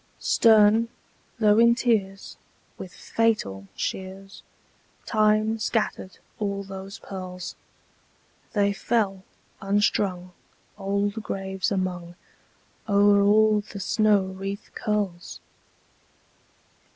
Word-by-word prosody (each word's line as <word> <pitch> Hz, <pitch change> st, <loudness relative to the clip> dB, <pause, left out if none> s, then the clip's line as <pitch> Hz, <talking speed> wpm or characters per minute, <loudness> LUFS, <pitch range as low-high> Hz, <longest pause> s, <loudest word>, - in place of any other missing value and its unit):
Stern, 220 Hz, 0 st, +4 dB, 0.5 s
though 215 Hz, -1 st, +4 dB
in 235 Hz, 0 st, +6 dB
tears, 205 Hz, -5 st, -1 dB, 0.4 s
with 180 Hz, -, -9 dB
Fatal 100 Hz, -, -1 dB
shears, 190 Hz, +1 st, -6 dB, 0.6 s
Time 215 Hz, 0 st, +2 dB
scattered 215 Hz, -3 st, -2 dB, 0.2 s
all 200 Hz, -1 st, -2 dB
those 195 Hz, +1 st, -8 dB
pearls! 185 Hz, -2 st, -7 dB, 1.0 s
They 200 Hz, -1 st, +2 dB
fell, 200 Hz, -3 st, -1 dB, 0.4 s
unstrung, 195 Hz, -2 st, 0 dB, 0.4 s
old 200 Hz, +2 st, -2 dB
graves 190 Hz, -1 st, -3 dB
among; 180 Hz, -3 st, -3 dB, 0.7 s
O'er 200 Hz, 0 st, +5 dB
all 210 Hz, +1 st, +4 dB
the 205 Hz, 0 st, -10 dB
snow 210 Hz, 0 st, +2 dB
wreath 195 Hz, +2 st, -6 dB
curls! 200 Hz, -5 st, -3 dB
200 Hz, 85 wpm, -25 LUFS, 190-215 Hz, 1.0 s, in